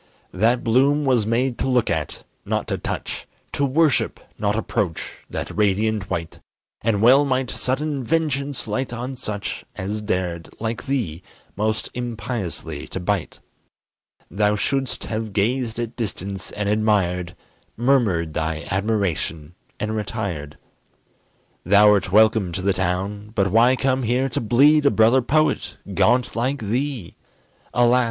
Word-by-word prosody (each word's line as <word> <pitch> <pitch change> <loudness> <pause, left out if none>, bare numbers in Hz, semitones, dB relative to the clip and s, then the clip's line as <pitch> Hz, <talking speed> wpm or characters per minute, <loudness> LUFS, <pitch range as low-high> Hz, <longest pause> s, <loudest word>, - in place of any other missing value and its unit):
That 115 +6 +2
bloom 140 +5 +3
was 120 -6 +2
made 120 +2 0
to - - 0
look 125 -3 +2
at, 80 -2 -3 0.2
not - - -2
to - - -1
touch; - - -5 0.2
To 145 - -1
worship, 145 +2 +2 0.2
not 105 0 +1
approach, 100 -6 -2
that - - -5
radiant 105 0 +1
white; 85 -1 -4 0.4
And 110 -2 +1
well 130 +5 +7
might 130 -2 0
sudden 140 +1 -2
vengeance 145 -1 -1
light 130 -1 -2
on 125 +2 -4
such 105 -5 -4
As 105 +3 -3
dared, 90 -5 -2
like 115 +1 -3
thee, 110 - -1 0.3
most 110 +2 -1
impiously 115 - -4
to - - -5
bite. 95 -1 -2 0.9
Thou 105 +3 +2
shouldst 135 +4 -1
have 110 -1 -4
gazed 115 +3 0
at 120 0 -4
distance, 100 -4 -4
and 105 -1 -3
admired, 95 -5 +1 0.4
Murmured 110 - +2
thy 80 0 -2
admiration 95 - -1 0.3
and 110 +1 -2
retired. 100 -9 -4 1.1
Thou'rt 100 0 +5
welcome 110 -2 +4
to 95 - -3
the 100 0 +3
town; 95 +3 -2
but 100 -2 +2
why 120 +4 +5
come 130 0 +1
here 125 +3 +1
To - - -2
bleed 140 +6 +5
a - - +7
brother 115 +3 +4
poet, 155 +5 +1 0.2
gaunt 125 +1 +2
like 130 +5 0
thee? 120 -1 -3 0.5
Alas! 120 +1 +4
110 Hz, 135 wpm, -22 LUFS, 100-125 Hz, 1.1 s, well